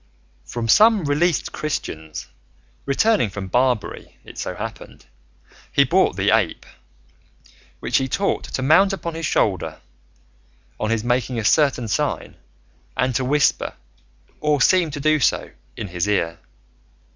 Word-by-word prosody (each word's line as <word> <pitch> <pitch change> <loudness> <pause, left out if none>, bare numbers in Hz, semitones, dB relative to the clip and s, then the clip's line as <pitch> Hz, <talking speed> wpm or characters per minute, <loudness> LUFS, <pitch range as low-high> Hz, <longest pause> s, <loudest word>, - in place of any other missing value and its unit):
From 120 -1 -4
some 215 - +5
released 150 +3 +1
Christians 80 - -5 0.6
returning 190 - +2
from 100 0 -6
Barbary, 125 -1 -1
it - - -11
so - - -4
happened, - - -8 0.7
he - - +5
bought - - +2
the - - +2
ape, - - -1 1.2
which - - +1
he 135 - 0
taught 195 +9 -1
to 130 - -4
mount 190 +8 +5
upon 170 -3 -4
his 165 -1 -3
shoulder 95 -5 0 1.0
on 110 - -1
his 115 -1 0
making 120 0 0
a 110 - -2
certain 140 -3 +3
sign, 105 - -2 0.6
and 130 0 +1
to 130 - 0
whisper, 145 +3 +1 0.6
or 150 -1 +1
seem 175 +5 +4
to 145 0 -6
do 155 +1 +2
so, 125 - +1 0.3
in 105 - -5
his 90 +2 -2
ear. 85 -5 0
130 Hz, 135 wpm, -21 LUFS, 110-155 Hz, 1.2 s, some